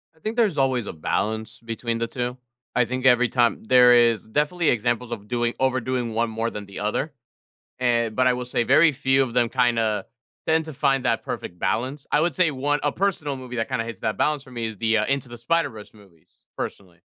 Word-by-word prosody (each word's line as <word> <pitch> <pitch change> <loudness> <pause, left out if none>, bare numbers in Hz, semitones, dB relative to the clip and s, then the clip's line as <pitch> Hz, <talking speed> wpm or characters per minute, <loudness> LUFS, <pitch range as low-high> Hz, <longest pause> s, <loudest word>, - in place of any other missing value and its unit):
I - - -27
think 220 +5 -4
there's 215 -10 +2
always 130 -5 +1
a - - -5
balance 110 +7 -2
between 115 0 -3
the 115 0 -1
2. 125 +1 -4 0.4
I 125 -1 +4
think 130 +2 -4
every 125 -1 +5
time 120 -3 +1
there 125 0 +7
is 115 -3 +4
definitely 150 +7 +1
examples 120 +1 0
of 105 -3 -6
doing 120 0 0
overdoing 130 -2 0
one 115 +1 0
more 115 +1 -2
than 105 -2 -7
the 100 - -9
other. 135 +8 -2 0.7
An 115 -3 +1
but 130 0 +3
I 125 - +4
will 125 0 -4
say 120 - 0
very 150 +6 +5
few 135 0 +2
of 120 - -5
them 120 -1 +2
kinda 115 -4 +1 0.4
tend 160 0 +2
to 155 - -7
find 135 -1 +1
that - - +1
perfect 90 - -6
balance. 130 +6 -2
I - - +4
would 170 +2 0
say 180 -4 +3
one 145 +2 0
a 145 - +1
personal 175 -7 -1
movie 125 -1 -8
that 115 - -2
kinda 115 - -1
hits 115 0 -8
that 110 -3 -1
balance 150 -2 +1
for 130 - -16
me 120 -2 -4
is 110 -2 -5
the, 110 +1 +2
uh, 110 - +1
Into 135 -2 -1
the 120 - -9
Spider-Verse 115 -5 -2
movies, 95 -7 -22
personally. 90 -3 -6
125 Hz, 220 wpm, -24 LUFS, 115-135 Hz, 0.7 s, there